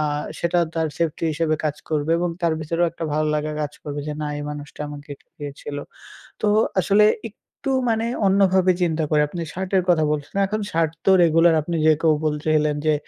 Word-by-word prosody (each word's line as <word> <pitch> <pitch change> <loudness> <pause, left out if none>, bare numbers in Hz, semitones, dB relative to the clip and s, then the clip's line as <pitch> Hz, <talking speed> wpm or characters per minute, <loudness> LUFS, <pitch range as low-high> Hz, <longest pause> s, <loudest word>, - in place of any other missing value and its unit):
আ - - +1 0.4
সেটা 170 +1 +1 0.2
তার 160 -1 0
safety 165 0 -1
হিসেবে 155 0 0
কাজ 150 -1 -1
করবে 155 +1 0
এবং 175 0 0
তার 170 - +2
ভেতরেও 165 +3 0
একটা 170 - -5
ভালো 155 0 +1
লাগা 150 0 -1
কাজ 145 0 -4
করবে, 145 -1 -5
যে 150 - -2
না - - -2
এই 145 - -5
মানুষটা 150 0 -9
আমাকে 145 0 -10
এটা - - -28
দিয়েছিল। 145 0 -7 0.7
তো 210 - +3 0.3
আসলে 200 +4 +4 0.2
একটু 265 +5 -7 0.2
মানে 225 +1 0 0.2
অন্যভাবে 190 -1 +4
চিন্তা 160 -2 +1
করে, 150 - +3
আপনি 170 +1 -5
shirt 185 +1 -4
এর 185 - +4
কথা 160 -3 +3
বলছেন। 145 +2 -4
এখন 215 +2 -2
shirt 165 -1 +1
তো - - +6
regular, 165 +1 +5
আপনি 170 +2 -3
যে 155 - +7
কেউ 160 -2 +4
বলতে 150 0 -2
গেলে 150 0 +3 0.2
যে 155 - +4
160 Hz, 200 wpm, -22 LUFS, 150-175 Hz, 0.7 s, যে